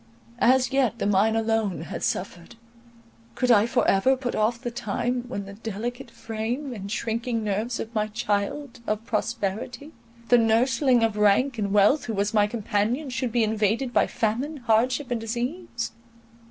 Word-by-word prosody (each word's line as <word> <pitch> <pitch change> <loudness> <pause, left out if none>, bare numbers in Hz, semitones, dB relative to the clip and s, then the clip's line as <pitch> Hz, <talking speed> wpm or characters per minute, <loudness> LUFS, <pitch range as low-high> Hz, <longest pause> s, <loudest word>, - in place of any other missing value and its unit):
As 255 +1 +4
yet 255 -4 +2
the - - -2
mind 205 +3 +3
alone 225 -5 0
had 165 - -6
suffered—could 230 +5 -5
I 215 -1 +5
for 245 - +1
ever 260 +8 +3
put 250 -2 -3
off 225 +2 +1
the 240 - -4
time, 240 +2 -2
when 200 -5 -5
the 200 - -9
delicate 230 +4 -5
frame 230 +5 -4
and 200 -3 -7
shrinking 230 0 -2
nerves 215 +4 -2
of 225 - -6
my 215 -1 0
child 215 +6 -2
of 215 +1 -2
prosperity, 220 +6 -3 0.4
the 245 - +6
nursling 235 +2 +3
of 220 -2 +1
rank 220 +5 +3
and 200 -1 -1
wealth, 210 +9 +4
who 225 - -3
was 205 +2 0
my 210 -1 +4
companion, 225 +5 -1
should 250 -1 -2
be 235 0 +2
invaded 220 +4 0
by - - +3
famine, 250 +8 -1
hardship, 245 +4 +2
and 235 -2 -1
disease? 240 +4 -3
230 Hz, 160 wpm, -25 LUFS, 210-245 Hz, 0.4 s, the